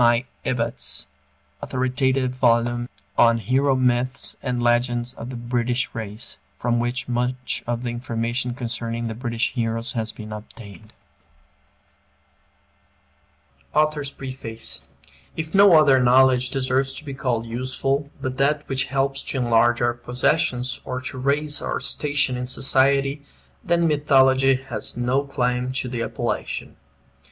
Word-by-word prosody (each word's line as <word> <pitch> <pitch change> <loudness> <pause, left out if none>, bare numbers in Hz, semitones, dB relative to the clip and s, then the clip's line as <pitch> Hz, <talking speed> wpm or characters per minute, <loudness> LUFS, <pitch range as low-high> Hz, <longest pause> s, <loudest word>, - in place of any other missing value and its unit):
I. 120 +2 +4 0.2
Ebbutt's 115 - -1 0.6
authoritative 130 0 0
volume 120 -1 +1 0.3
on 115 0 +6
"Hero 130 +5 +2
Myths 130 +1 +1
and 125 -2 -2
Legends 120 0 +1
of 115 - -8
the 130 - -6
British 120 +1 -1
Race," 110 -1 -6 0.2
from 120 -1 0
which 120 +1 -1
much 125 +1 -1
of 120 0 -2
the 120 - -2
information 120 0 -2
concerning 115 -2 -3
the 115 - -3
British 115 0 -1
heroes 115 -1 -2
has 115 -3 -3
been 110 0 -9
obtained 105 0 -11 2.8
AUTHOR'S 150 -2 +2
PREFACE 130 -5 -6 0.6
If 160 -1 -4
no 200 -1 +7
other 135 -4 +5
knowledge 125 0 +5
deserves 135 0 0
to 155 - -7
be 140 - -5
called 125 -4 -1
useful 130 +4 -2
but 130 0 -4
that 145 +2 +1
which 135 -1 0
helps 135 0 0
to - - -2
enlarge 120 -1 +3
our 120 0 +2
possessions 125 +1 0
or 130 0 -4
to 130 0 -6
raise 145 +3 0
our - - -2
station 145 -3 0
in 125 0 -4
society, 135 +2 +2 0.4
then 170 -1 +2
Mythology 135 -3 +4
has 130 -2 -5
no 125 +3 +1
claim 125 -1 -1
to 130 -1 -1
the 120 -1 -3
appellation. - - -3
125 Hz, 130 wpm, -23 LUFS, 120-135 Hz, 2.8 s, no